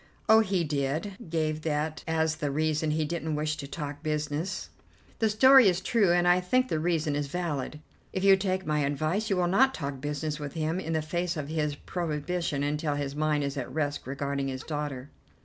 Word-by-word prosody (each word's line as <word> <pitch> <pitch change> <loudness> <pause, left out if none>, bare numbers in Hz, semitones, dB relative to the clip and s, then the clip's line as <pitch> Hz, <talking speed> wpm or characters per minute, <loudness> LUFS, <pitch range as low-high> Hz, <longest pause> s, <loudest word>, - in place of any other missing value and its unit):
"Oh, 220 0 +8
he 195 -5 +1
did: 150 +5 -1 0.2
gave 155 -1 -1
that 155 0 -2
as 160 -1 +1
the 150 -2 -2
reason 155 +2 0
he 155 0 +1
didn't 160 -1 -2
wish 155 +1 -1
to 140 - -6
talk 145 0 -6
business." 155 +3 -2 0.5
"The 220 - +3
story 260 +3 +7
is 180 -2 +3
true, 200 -1 +2
and 175 0 +3
I 175 +1 +5
think 255 +8 +1
the 155 - 0
reason 160 -3 0
is 145 -1 -1
valid. 150 -3 -3 0.3
If 190 - -3
you 195 0 +8
take 190 -1 -1
my 150 0 +1
advice, 155 +9 0
you 195 - +1
will 180 - +2
not 265 +9 +3
talk 140 -4 -5
business 150 +1 -3
with 145 -2 -5
him 160 +2 -1
in 165 -3 -3
the 160 -1 0
face 175 +2 -2
of 145 -1 -4
his 150 -2 -1
prohibition 160 -2 -2
until 150 +1 -1
his 140 -1 -3
mind 150 -1 +1
is 140 0 -3
at 125 -2 -4
rest 145 -1 -2
regarding 140 0 -2
his 130 -1 -4
daughter." 145 -3 -4
155 Hz, 200 wpm, -28 LUFS, 145-175 Hz, 0.5 s, Oh